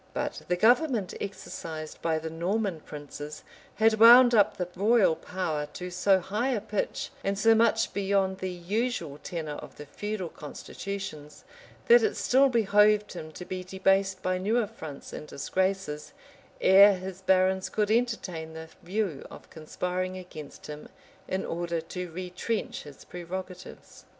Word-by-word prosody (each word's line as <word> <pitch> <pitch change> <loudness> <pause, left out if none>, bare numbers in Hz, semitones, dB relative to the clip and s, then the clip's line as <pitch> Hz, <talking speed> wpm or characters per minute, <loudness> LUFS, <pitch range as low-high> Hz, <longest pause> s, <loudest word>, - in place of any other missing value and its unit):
But - - -3
the 180 - +1
government 235 - +3
exercised 160 -5 -7
by 160 -1 +1
the 160 0 -5
Norman 185 +2 -1
princes 150 0 -9 0.3
had 220 +1 +3
wound 240 +2 +9
up 210 -3 +4
the 180 - -2
royal 205 -3 +4
power 160 -6 -3
to 180 0 -6
so 190 +2 +3
high 210 +8 -2
a 245 -5 +1
pitch, 210 0 -3
and 195 0 -1
so 225 +2 +5
much 225 0 +2
beyond 195 -1 0
the 185 - -3
usual 180 - -2
tenor 155 -4 -5
of - - -11
the 150 - -8
feudal 205 +2 -4
constitutions, 155 0 -7 0.4
that 475 0 +8
it 435 -2 0
still 270 +2 +4
behoved 210 -2 +3
him 155 -3 -8
to 180 - -8
be 185 0 -5
debased 190 0 +1
by 185 0 0
new 210 +5 +1
affronts 160 -10 -5
and 150 - -7
disgraces, 185 0 -2 0.5
ere 200 +1 +7
his 185 0 -7
barons 190 0 +2
could 210 -1 0
entertain 205 -9 -1
the 160 0 -9
view 185 -5 -2
of - - -13
conspiring 180 +3 -3
against 155 -5 -10
him 150 0 -9 0.4
in 190 +1 -2
order 170 0 -2
to 180 +2 -6
retrench 180 +5 -4
his 145 -2 -13
prerogatives. 180 +1 -8
185 Hz, 150 wpm, -28 LUFS, 165-210 Hz, 0.5 s, wound